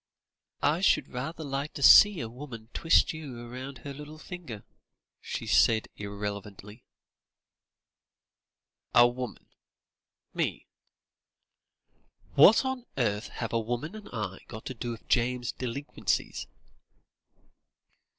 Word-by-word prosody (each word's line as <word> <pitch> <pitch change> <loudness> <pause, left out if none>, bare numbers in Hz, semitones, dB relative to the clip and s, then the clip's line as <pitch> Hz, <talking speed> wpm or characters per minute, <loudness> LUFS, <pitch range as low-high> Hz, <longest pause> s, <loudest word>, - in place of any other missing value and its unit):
"I 150 +5 +2
should 195 - +3
rather 155 +6 -5
like 140 +1 -4
to 140 - -4
see 205 +1 +8
a 115 - -3
woman 115 -2 -10
twist 165 - +3
you 130 -7 -8
round 130 +2 -7
her 140 +4 -7
little 150 +2 -10
finger," 155 - -8 0.6
she - - -5
said 110 -2 +3
irrelevantly. 100 +1 -7 2.1
"A 120 0 +8
woman 125 0 -6 0.9
me? - - -2 1.7
What 210 - +7
on 260 -2 -3
earth 105 -4 0
have 115 -1 -5
a 115 - +2
woman 120 - -3
and 215 -1 -10
I 105 -5 -4
got 110 - -9
to 130 - -4
do 120 0 -5
with 115 -1 -7
James's 125 0 +1
delinquencies?" 130 +3 -3
125 Hz, 110 wpm, -29 LUFS, 115-150 Hz, 2.1 s, see